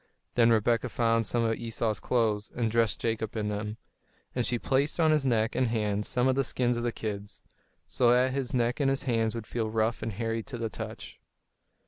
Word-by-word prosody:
Then 115 -1 +5
Rebekah 115 +2 +2
found 115 -2 +1
some 120 -1 +1
of 115 0 +1
Esau's 115 -2 -2
clothes, 110 -4 0
and 115 -2 0
dressed 115 -2 +1
Jacob 110 -1 -2
in 105 -1 -1
them; 105 +1 -4 0.6
and 125 - 0
she 120 - +1
placed 140 +6 0
on 160 -2 +5
his 150 -3 +2
neck 115 -2 +2
and 130 - +1
hands 105 -2 -1
some 125 +1 +2
of 130 - +4
the 135 +1 +1
skins 125 -1 0
of 120 - -2
the 120 0 0
kids, 105 -2 -6 0.4
so 120 - +2
that 125 +2 +4
his 135 -2 -2
neck 120 +1 0
and 140 -2 +3
his 135 0 0
hands 115 -3 0
would 115 -2 -5
feel 110 -1 -2
rough 110 +1 0
and 110 -1 -3
hairy 115 +2 -2
to 120 - -7
the 115 -1 -2
touch. - - -8
115 Hz, 210 wpm, -29 LUFS, 110-125 Hz, 0.6 s, Then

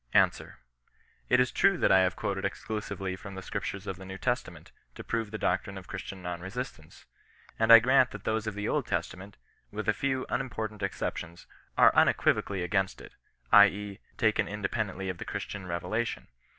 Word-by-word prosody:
Answer. - - +2 0.7
It 125 - +5
is 125 -1 +3
true 195 -1 +3
that - - +3
I 95 - +7
have 95 -1 +2
quoted 95 -1 -3
exclusively 100 -2 -4
from 100 +1 -10
the 95 - -7
Scriptures 100 0 -4
of 95 -3 -4
the 95 - -10
New 95 0 -7
Testament, - - -3 0.2
to - - -8
prove 115 -2 -2
the 110 - -5
doctrine 95 0 -1
of 95 -1 -10
Christian 95 -1 -7
non 90 -1 -4
resistance. 95 - -7 0.5
And 110 0 +4
I 115 - +13
grant 125 +2 +4
that 105 -1 -9
those 110 0 -1
of 110 - -3
the 105 +1 -3
Old - - 0
Testament, 100 +2 -4 0.3
with 105 0 -5
a 105 - +4
few 130 +3 -1
unimportant 110 -5 -3
ex 95 -1 -3
ceptions, 85 0 -4 0.3
are - - +6
unequivocally 95 -3 +2
against 95 +2 0
it, - - -12 0.4
i. 100 0 +10
e., 100 0 -6 0.2
taken 110 -3 +2
inde 105 -1 -3
pendently 95 -4 -2
of 90 -2 -4
the - - -4
Christian 95 -3 -5
revelation. 110 +7 -3
100 Hz, 190 wpm, -29 LUFS, 95-110 Hz, 0.7 s, I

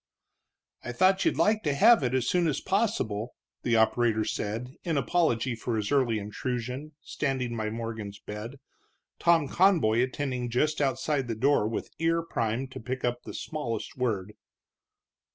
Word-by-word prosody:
"I 120 - -5
thought 190 +6 +3
you'd - - +2
like 215 0 +3
to 145 -7 0
have 225 +7 +6
it 125 -1 0
as 125 -2 0
soon 175 -2 +2
as 150 - 0
possible," 125 - -1 0.3
the 120 - +1
operator 110 -1 +3
said, 115 +5 -3
in 165 -4 0
apology 130 -5 +1
for 115 +1 -3
his 105 -2 -2
early 130 -6 +2
intrusion, 125 +7 -4
standing 130 -5 -2
by 110 -1 -2
Morgan's 110 -2 -5
bed, 105 +6 -8 0.6
Tom 165 -4 +4
Conboy 155 - +3
attending 130 -1 -2
just 150 +6 +1
outside 135 0 0
the 115 - -2
door 130 -1 +3
with 110 - -4
ear 165 0 +1
primed 120 -3 -2
to - - -7
pick 125 +3 -4
up 120 0 -1
the - - -7
smallest 120 -9 -4
word. 105 -6 -2
125 Hz, 155 wpm, -28 LUFS, 115-150 Hz, 0.6 s, have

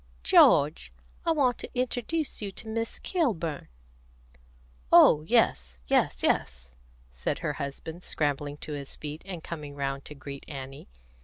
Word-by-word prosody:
"George, 60 0 +5 0.4
I - - +5
want 270 -6 +2
to - - -6
introduce 255 +5 -2
you 200 -2 -3
to 220 - -7
Miss 225 +1 -3
Kilburn." 180 - -1 1.2
"Oh 150 - +8
yes, 60 - +2
yes, - - +1
yes," 60 -1 0 0.4
said 60 0 -2
her 150 - 0
husband, 145 +4 -6
scrambling 145 -3 -2
to 150 - -5
his 140 -1 -6
feet, 150 +1 -7
and 180 -4 -7
coming 150 -4 -7
round 135 -1 -3
to 150 - -9
greet 140 0 -8
Annie. 135 - -8
150 Hz, 140 wpm, -28 LUFS, 135-215 Hz, 1.2 s, Oh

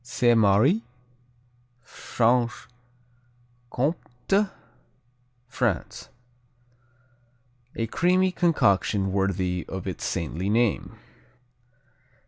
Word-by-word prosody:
Sainte 120 -1 +2
Marie 110 - +3 1.0
Franche 120 +1 -1 1.0
Comté, 160 +7 -1 1.0
France 125 - -3 1.7
A 115 - -1
creamy 185 - +2
concoction 105 - +1
worthy 95 -2 -1
of 95 -1 -6
its 90 -5 -5
saintly 85 +4 -3
name. 115 0 0
115 Hz, 65 wpm, -25 LUFS, 95-135 Hz, 1.7 s, Marie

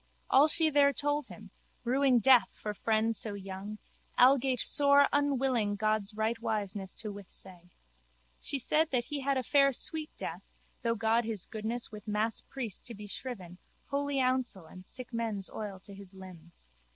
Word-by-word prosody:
All 275 +3 +7
she 315 0 +3
there 280 -1 +5
told 290 +2 -1
him, - - -12 0.3
ruing 260 +1 +3
death 245 +2 +6
for 210 - -5
friend 220 +2 +1
so 215 -2 -1
young, 195 +2 -7 0.4
algate 260 0 +5
sore 285 -1 +5
unwilling 265 -7 +1
God's 215 0 -1
rightwiseness 215 -3 -2
to 215 -2 -3
withsay. 185 -2 -8 0.7
She 280 - -1
said 305 +5 +1
that 250 -2 0
he 290 +2 -4
had 275 0 0
a 260 - -1
fair 275 +1 +4
sweet 310 +4 -1
death - - -5 0.4
through 230 -1 0
God 225 +1 +2
His 220 -5 -1
goodness 225 +3 -4
with 210 0 -10
masspriest 220 +1 -3
to 235 - -4
be 210 +1 -9
shriven, 195 -5 -6 0.3
holy 285 0 -1
housel 255 -8 0
and 185 +3 -12
sick 250 +5 -5
men's 220 -4 -3
oil 205 -3 -6
to 200 - -10
his 195 -1 -13
limbs. 175 - -13
230 Hz, 160 wpm, -31 LUFS, 205-270 Hz, 0.7 s, All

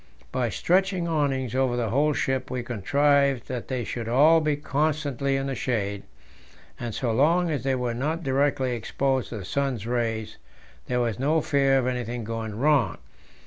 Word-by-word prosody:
By 125 -2 0
stretching 185 - +1
awnings 135 -6 0
over 130 -2 +1
the 115 -3 -1
whole 150 +4 +2
ship 130 -2 -1
we 125 -1 -3
contrived 140 +3 +2
that 125 -2 -5
they 130 -2 -2
should 115 0 -5
all 155 +7 +5
be 155 -1 +1
constantly 145 -2 -1
in 135 0 -1
the 135 - -2
shade, 100 -6 -2 0.8
and 120 -3 -4
so 120 -3 -1
long 165 +8 +3
as 145 -4 -2
they 135 -1 +1
were 125 -2 -2
not 155 +8 -2
directly 135 -1 +1
exposed 130 +3 -1
to 115 - -5
the 95 - -7
sun's 135 -2 -2
rays, 115 -2 -2 0.5
there 125 0 0
was 115 -3 -1
no 150 +5 +2
fear 140 -3 +2
of 130 - +1
anything 125 -2 -3
going 110 -1 -4
wrong. 135 - +2
130 Hz, 175 wpm, -25 LUFS, 120-145 Hz, 0.8 s, all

